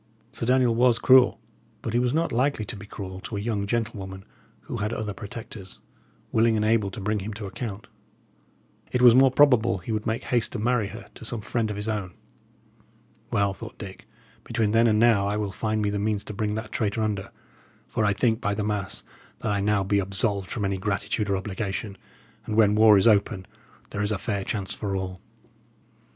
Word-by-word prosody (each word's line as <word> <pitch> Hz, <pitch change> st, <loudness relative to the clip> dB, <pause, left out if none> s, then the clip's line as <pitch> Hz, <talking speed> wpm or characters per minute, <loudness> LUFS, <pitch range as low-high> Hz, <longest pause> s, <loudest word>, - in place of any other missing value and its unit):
Sir 115 Hz, -, -4 dB
Daniel 125 Hz, -2 st, +4 dB
was 120 Hz, 0 st, +4 dB
cruel, 130 Hz, -2 st, +5 dB, 0.4 s
but 115 Hz, -, -3 dB
he 120 Hz, -, +3 dB
was 125 Hz, 0 st, +1 dB
not 165 Hz, +4 st, 0 dB
likely 125 Hz, -2 st, +1 dB
to -, -, -4 dB
be 105 Hz, 0 st, -10 dB
cruel 95 Hz, -2 st, -7 dB
to 105 Hz, +2 st, -6 dB
a -, -, -2 dB
young 100 Hz, -1 st, -2 dB
gentlewoman 100 Hz, -4 st, -3 dB, 0.4 s
who -, -, -6 dB
had 105 Hz, +2 st, -2 dB
other 105 Hz, -2 st, -3 dB
protectors, 100 Hz, -2 st, -8 dB, 0.5 s
willing 115 Hz, 0 st, +3 dB
and 105 Hz, 0 st, +1 dB
able 110 Hz, -2 st, +2 dB
to 95 Hz, -, -8 dB
bring 105 Hz, +1 st, -1 dB
him 100 Hz, +2 st, -6 dB
to 105 Hz, -1 st, -6 dB
account. 100 Hz, 0 st, -6 dB, 1.1 s
It 125 Hz, 0 st, +1 dB
was 120 Hz, -2 st, +9 dB
more 135 Hz, +2 st, +6 dB
probable 125 Hz, -6 st, +4 dB
he 90 Hz, +6 st, -7 dB
would 110 Hz, 0 st, -2 dB
make 110 Hz, +1 st, -1 dB
haste 120 Hz, -3 st, 0 dB
to -, -, -2 dB
marry 115 Hz, -1 st, +1 dB
her 110 Hz, +4 st, -9 dB
to -, -, -12 dB
some 115 Hz, 0 st, -3 dB
friend 110 Hz, +1 st, -1 dB
of 105 Hz, -, -3 dB
his 105 Hz, +1 st, -5 dB
own. 105 Hz, -5 st, -3 dB, 1.1 s
"Well," 100 Hz, -1 st, +1 dB
thought 115 Hz, +3 st, -10 dB
Dick, 95 Hz, -3 st, -10 dB, 0.4 s
"between 110 Hz, -2 st, 0 dB
then 115 Hz, +1 st, +4 dB
and 110 Hz, -1 st, +3 dB
now 110 Hz, -3 st, +4 dB
I 105 Hz, +1 st, -1 dB
will 105 Hz, -2 st, -2 dB
find 110 Hz, +2 st, -1 dB
me 100 Hz, -, +1 dB
the 100 Hz, -, -2 dB
means 105 Hz, 0 st, -1 dB
to -, -, -7 dB
bring 105 Hz, +1 st, -1 dB
that 110 Hz, 0 st, -5 dB
traitor 110 Hz, 0 st, -1 dB
under; 100 Hz, -2 st, -2 dB, 0.6 s
for 110 Hz, -, -1 dB
I 105 Hz, -, +3 dB
think, 110 Hz, +2 st, +1 dB
by 105 Hz, -4 st, 0 dB
the 105 Hz, -, -2 dB
mass, 100 Hz, -2 st, -3 dB, 0.3 s
that -, -, -2 dB
I 100 Hz, -, +1 dB
be 100 Hz, -1 st, +1 dB
now -, -, +3 dB
absolved 100 Hz, 0 st, -1 dB
from 105 Hz, -4 st, -2 dB
any 95 Hz, 0 st, -1 dB
gratitude 100 Hz, +1 st, -1 dB
or 100 Hz, -, +2 dB
obligation; 100 Hz, +1 st, -4 dB, 0.5 s
and 110 Hz, -, -2 dB
when 105 Hz, -2 st, +5 dB
war 105 Hz, -1 st, +7 dB
is 95 Hz, -, +4 dB
open, 100 Hz, -3 st, +2 dB, 0.5 s
there 100 Hz, -, -3 dB
is 105 Hz, +1 st, 0 dB
a 105 Hz, -, 0 dB
fair 100 Hz, 0 st, -2 dB
chance 100 Hz, -3 st, -3 dB
for 100 Hz, -2 st, -3 dB
all." 95 Hz, -1 st, -4 dB
105 Hz, 210 wpm, -26 LUFS, 100-115 Hz, 1.1 s, was